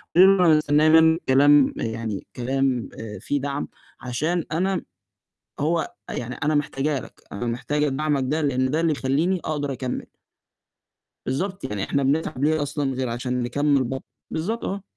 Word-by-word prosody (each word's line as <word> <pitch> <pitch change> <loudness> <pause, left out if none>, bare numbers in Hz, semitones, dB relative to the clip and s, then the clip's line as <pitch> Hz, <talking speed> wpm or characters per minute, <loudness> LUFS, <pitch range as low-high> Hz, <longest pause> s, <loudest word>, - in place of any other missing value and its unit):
قولي 185 +2 +9
له 180 - +4
أنا 155 -1 +6
مستنية 150 +1 +3
منك 160 +1 +5
كلام 145 +1 +6
يعني 110 -3 -4
كلام 130 -1 0
آآ، 110 -1 -7
فيه 145 -2 -2
دعم، 140 0 -3 0.3
عشان 155 +7 -1
أنا 185 +3 0 0.8
هو 160 +2 0 0.2
يعني 125 +1 -4
أنا 150 +1 0
محتاجه 145 -1 0
لك، - - -13
أنا 120 +4 -4
محتاجة 140 +5 0
دعمك 140 0 0
ده، 155 +3 0
لأن 130 -2 +1
ده 160 +2 +1
اللي 165 -1 +2
يخلِّيني 150 +8 0
أقدر 145 -2 -2
أكمِّل. 125 0 -4 1.2
بالضبط، 185 +9 -2
يعني 105 -6 -3
إحنا 140 -1 0
بنتعب 140 -1 0
ليه 155 0 +2
أصلًا 145 -2 -2
غير 130 -1 -2
عشان 125 +1 -2
نكمل 140 +2 +2
ب 130 +2 -3 0.3
بالضبط، 220 +9 -3
آه. 195 0 -3
145 Hz, 160 wpm, -24 LUFS, 130-155 Hz, 1.2 s, قولي